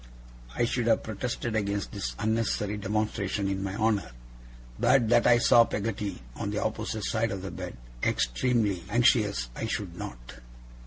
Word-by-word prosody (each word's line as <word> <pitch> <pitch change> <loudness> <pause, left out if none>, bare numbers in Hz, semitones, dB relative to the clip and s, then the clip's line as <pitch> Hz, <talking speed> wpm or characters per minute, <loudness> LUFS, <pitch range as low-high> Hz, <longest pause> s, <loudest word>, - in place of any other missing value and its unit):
I 120 - +2
should 120 0 -1
have 115 - +3
protested 115 +1 -3
against 100 -1 -1
this 100 -2 -4
unnecessary 105 -1 0
demonstration 105 -1 -1
in 95 0 -2
my 95 0 -3
honour, 105 - 0 0.7
but 120 -2 +4
that 120 - +5
I 120 - +7
saw 120 0 +6
Peggotty, 100 -7 -3
on - - -3
the - - -3
opposite 110 -2 -3
side 115 +3 0
of 95 -2 -4
the 95 - -5
bed, - - -7 0.2
extremely 100 - +1
anxious 105 - +3
I - - -3
should - - -3
not. - - -8
105 Hz, 155 wpm, -28 LUFS, 100-115 Hz, 0.7 s, I